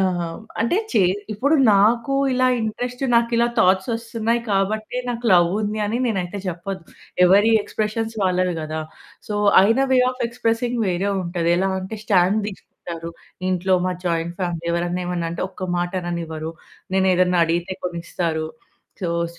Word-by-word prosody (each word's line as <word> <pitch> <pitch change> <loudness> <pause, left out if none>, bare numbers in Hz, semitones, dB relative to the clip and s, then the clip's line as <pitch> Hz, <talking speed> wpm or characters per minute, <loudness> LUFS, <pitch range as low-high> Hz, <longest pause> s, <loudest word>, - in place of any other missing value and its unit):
ఆహ్, 175 -3 -1 0.2
అంటే 230 +10 +2
చే 225 - +3 0.3
ఇప్పుడు 275 +9 +1 0.2
నాకు 230 +6 +3 0.2
ఇలా 255 0 +2
ఇంట్రెస్ట్, 245 +3 -3
నాకిలా 235 0 +3
థాట్స్ 190 0 +3
వస్తున్నాయి 230 0 -1
కాబట్టే 215 +4 -1
నాకు 240 0 -4
లవ్ 175 -1 +6
ఉంది 210 +1 -2
అని 220 +3 -1
నేనైతే 200 -4 -2
చెప్పద్దు. 180 +1 -5 0.4
ఎవరి 200 +5 +5
ఎక్స్‌ప్రెషన్స్ 220 +2 -3
వాళ్ళవి 185 -1 +1
గదా! 155 0 -4 0.5
సో 210 - -3 0.3
ఆయన 225 +6 +4
వే 255 - +5
ఆఫ్ 255 0 -6
ఎక్స్‌ప్రెసింగ్ 235 +1 -1
వేరే 185 +2 0
ఉంటది. 170 -1 -1
ఎలా 190 +1 +1
అంటే 190 +4 -6
స్టాండ్ 195 0 +3
తీసుకుంటారు. 170 -4 -8 0.4
ఇంట్లో 185 +1 +1
మాది 180 -1 -4
జాయింట్ 170 0 -1
ఫ్యామిలీ. 170 -2 -3
ఎవరైనా, 175 +1 -1
ఏమన్నా 175 -2 -2
అంటే 170 - -3
ఒక్క 185 0 -7
మాట 175 +1 -2
అననివ్వరు. 165 -2 -4 0.4
నేనేదన్నా 185 -2 +3
అడిగితే 170 +3 -1
కొనిస్తారు. 170 -2 -2 0.6
సో 175 - 0 0.2
స్ 170 - -19
190 Hz, 145 wpm, -22 LUFS, 175-225 Hz, 0.6 s, లవ్